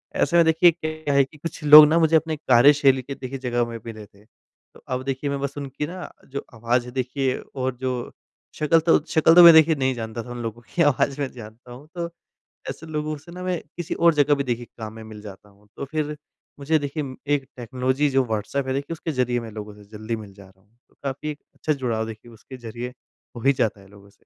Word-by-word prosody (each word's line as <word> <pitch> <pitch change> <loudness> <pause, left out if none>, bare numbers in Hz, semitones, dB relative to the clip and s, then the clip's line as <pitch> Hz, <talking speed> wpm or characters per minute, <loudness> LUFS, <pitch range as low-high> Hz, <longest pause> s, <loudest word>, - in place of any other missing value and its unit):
ऐसे 170 - +1
में 170 - +6
देखिए 165 +2 +5
क्या 155 -2 -2
है 140 0 +5
कि 135 +3 -12
कुछ 165 0 -7
लोग 150 +1 +11
ना 165 +2 +3
मुझे 160 0 +3
अपने 160 0 +1
कार्यशैली 135 0 +4
के 140 +2 -7
देखिए 135 +1 -6
जगह 120 -2 0
में 115 - -7
मिले 110 -2 -8
थे। 100 +1 -23
तो 110 - -26
अब 130 0 -3
देखिए 135 +1 -2
मैं 140 0 -2
बस 140 +1 -4
उनकी 140 +1 -5
ना 180 +3 -8
अ, - - -13
जो 140 +1 -6
आवाज़ 120 +2 0
है 125 - -9
देखिए 130 +1 -1 0.2
और 130 -1 -2
जो 130 -2 -3 0.4
शक्ल 155 +2 +3
तो 165 +1 +4
शक्ल 160 +1 +4
तो 175 - +10
मैं 170 -1 +11
देखिए 160 0 +6
नहीं 130 -1 0
जानता 115 -1 -6
था 125 - -12
उन 120 0 -6
लोगों 115 +1 -6
की 175 - +2
आवाज़ 145 -1 +2
मैं 140 - -1
जानता 115 +1 -12
हूँ 130 +5 -12
तो 170 -1 -2 0.6
ऐसे 160 - -7
लोगों 155 0 -3
से 160 +4 -15
ना 180 +1 -8
मैं 180 -2 -1 0.2
किसी 175 - -4
और 170 -1 +4
जगह 145 0 +3
भी 140 - -2
देखिए 120 -2 -3
काम 110 -1 -6
में 110 0 -10
मिल 110 -1 -11
जाता 105 0 -12
हूँ 100 +1 -25
तो - - -4
फिर 150 -1 -2 0.4
मुझे 155 +3 +1
देखिए 145 +1 -4
म 130 -1 -7 0.2
एक 135 -2 -4
टेक्नोलॉज़ी 130 +4 -1
जो 135 -1 +2
व्हाट्सऐप 110 +5 -3
है 130 - -1
देखिए 140 +4 -3
उसके 160 0 -5
ज़रिए 125 -2 0
मैं 115 -1 -8
लोगों 105 0 -8
से 105 - -15
जल्दी 110 +2 -3
मिल 105 -3 -10
जा 100 0 -15
रहा 95 0 -22
हूँ। 110 +5 -35
तो - - -31
काफ़ी 140 +2 -4
एक 150 - -10 0.2
अच्छा 155 - -1
जुड़ाव 120 -5 -2
देखिए 110 +2 -10
उसके 130 +4 -12
ज़रिए 120 +1 -7 0.4
हो 115 - -7
ही 140 +2 +4
जाता 110 -5 -1
है 95 - -17
लोगों 100 0 -17
से। 100 - -30
130 Hz, 245 wpm, -23 LUFS, 115-150 Hz, 0.6 s, लोग